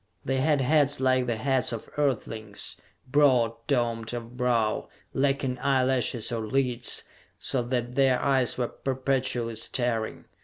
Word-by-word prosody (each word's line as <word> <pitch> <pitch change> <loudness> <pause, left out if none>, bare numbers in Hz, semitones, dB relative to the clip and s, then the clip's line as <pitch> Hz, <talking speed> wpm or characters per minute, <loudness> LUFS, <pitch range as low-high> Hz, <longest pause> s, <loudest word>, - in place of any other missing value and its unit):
They 135 0 0
had 145 +1 +2
heads 145 +1 +3
like 130 -1 +2
the 120 - 0
heads 130 +3 +1
of 115 -2 -5
Earthlings, 115 -7 -2 0.3
broad 130 -4 +4
domed 120 -4 0
of 120 0 -7
brow, 120 -4 0 0.2
lacking 135 -2 0
eyelashes 130 -4 +1
or 115 -2 -2
lids, 125 -1 0 0.3
so 130 - 0
that 120 0 -2
their 130 -1 +3
eyes 130 -3 +2
were 125 -2 -1
perpetually 130 -3 -1
staring. 115 0 -1
125 Hz, 130 wpm, -27 LUFS, 120-135 Hz, 0.3 s, broad